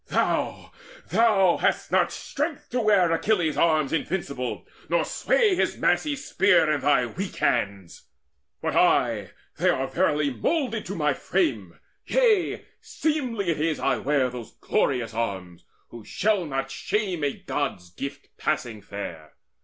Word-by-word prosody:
Thou - - -1 0.4
thou 200 -6 +4
hast - - 0
not - - +3
strength 300 +1 -4
To 250 0 0
wear 200 -6 +4
Achilles' 170 -2 +1
arms 155 -4 +2
invincible, 145 -7 -3 0.2
Nor - - +2
sway 485 -5 +2
his 365 - 0
massy 300 -2 +1
spear 180 - +3
in 150 - 0
thy 140 -3 +3
weak 185 - -5
hands! 100 -7 -1 0.6
But - - -1
I - - +3 0.3
they - - +3
are 135 - +1
verily 150 -2 +1
moulded 230 - -1
to 195 - -4
my 150 -4 +1
frame: 325 - -1 0.3
Yea, 450 -7 +2 0.2
seemly 255 - -2
it 150 - -2
is 160 0 0
I 135 -2 +1
wear 135 0 +1
those 120 -2 -8
glorious 125 -5 0
arms, 95 -6 -4 0.2
Who 115 -2 -10
shall 200 - 0
not 135 -1 -3
shame 190 +1 -2
a 140 - +1
God's 140 - -4
gifts 140 +10 -7
passing 110 -4 -2
fair. 85 -6 -8
155 Hz, 140 wpm, -25 LUFS, 125-210 Hz, 0.6 s, thou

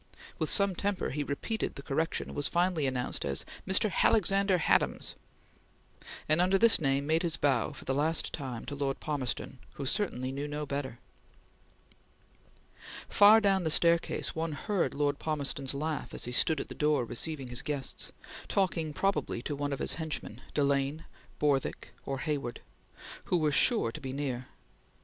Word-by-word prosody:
With - - 0
some 200 -2 +5
temper 200 +2 -1
he 145 +1 -2
repeated 145 +11 -3
the 140 - -8
correction, 160 +4 -1
and - - -8
was 145 - +2
finally 175 -4 +1
announced 125 -1 -1
as 70 -1 -1 0.2
"Mr. 190 +2 +3
Halexander 195 -2 +3
Hadams," 165 - +1 1.1
and 155 +3 +4
under 185 +2 +4
this 230 -2 +5
name 135 -1 +1
made 160 +2 +2
his 170 -3 0
bow 135 -5 +1
for - - -11
the 135 - 0
last 155 +4 +1
time 130 -6 -5
to - - -5
Lord 140 -1 -2
Palmerston 135 -3 -3 0.2
who 140 - -5
certainly 130 -6 -1
knew 140 +2 -4
no 150 0 -4
better. 140 -4 -4 2.1
Far 210 +2 +8
down 195 -3 +2
the 160 - 0
staircase 170 +2 +3
one 160 0 -2
heard 195 +5 -1
Lord 145 0 0
Palmerston's 140 -3 -1
laugh 155 +2 -3
as - - -4
he 120 - -4
stood 155 +4 +3
at - - -4
the - - -7
door 150 -4 +1
receiving 135 +2 -3
his 120 +1 -2
guests, 140 -4 -3 0.4
talking 170 -5 0
probably 150 -10 -1
to 145 - -3
one 145 0 -2
of 140 - -1
his - - -1
henchmen, 150 -7 -5
Delane, 140 +2 +1 0.3
Borthwick, 140 -3 0
or 135 - -2
Hayward, 140 -6 -3 0.6
who 180 - +1
were 155 -2 +2
sure 215 - +3
to 155 - -8
be 130 -2 -5
near. 130 -3 -3
150 Hz, 165 wpm, -30 LUFS, 135-170 Hz, 2.1 s, Far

